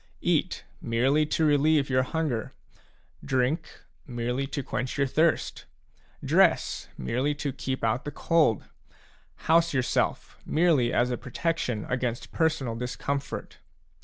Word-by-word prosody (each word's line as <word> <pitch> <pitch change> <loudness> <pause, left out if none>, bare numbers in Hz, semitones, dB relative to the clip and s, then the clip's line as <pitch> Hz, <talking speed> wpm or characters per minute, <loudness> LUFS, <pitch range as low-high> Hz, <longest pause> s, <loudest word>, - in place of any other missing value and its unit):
Eat - - +1 0.2
merely 135 +6 +2
to 160 - +1
relieve 150 -1 +3
your 130 -1 +2
hunger; 130 -4 -2 0.7
drink 130 +4 -1 0.3
merely 125 +2 -2
to 140 0 -4
quench 130 +1 -3
your 140 - +3
thirst; 155 +4 +1 0.6
dress - - +3
merely 130 - -1
to 145 -2 -3
keep 130 -1 -4
out 115 +3 +1
the - - -4
cold; 150 - +2 0.8
house 165 -2 +3
yourself 130 -1 -1
merely 155 -8 +2
as 125 +1 +2
a 125 - -1
protection 130 -4 -2
against 125 -2 -2
personal 155 -8 0
discomfort. 135 +4 -4
135 Hz, 120 wpm, -27 LUFS, 125-155 Hz, 0.8 s, relieve